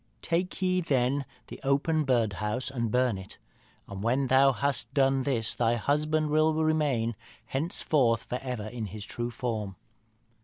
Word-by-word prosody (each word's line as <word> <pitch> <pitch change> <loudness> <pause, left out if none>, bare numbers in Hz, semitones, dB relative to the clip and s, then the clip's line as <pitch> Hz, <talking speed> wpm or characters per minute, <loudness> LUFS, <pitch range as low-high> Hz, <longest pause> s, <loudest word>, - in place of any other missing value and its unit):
Take 180 +3 -1
ye, 185 0 +2
then, 135 -3 +1 0.2
the - - -10
open 145 +3 +1
birdhouse 115 0 0
and 115 -4 -2
burn 125 -3 +1
it. 95 - -11 0.5
And 100 -1 -7
when 125 +5 +1
thou 135 +1 +5
hast 135 -4 -1
done 135 -1 +3
this 125 -5 0
thy 120 0 +1
husband 150 +5 0
will 155 +1 +3
remain 150 -8 +1 0.3
henceforth 135 -5 +1
and 125 - -2
for 135 - -10
ever 120 -5 -3
in 110 -1 -5
his 100 +1 -6
true 120 +1 -4
form.' 110 -5 -3
130 Hz, 155 wpm, -28 LUFS, 115-145 Hz, 0.5 s, thou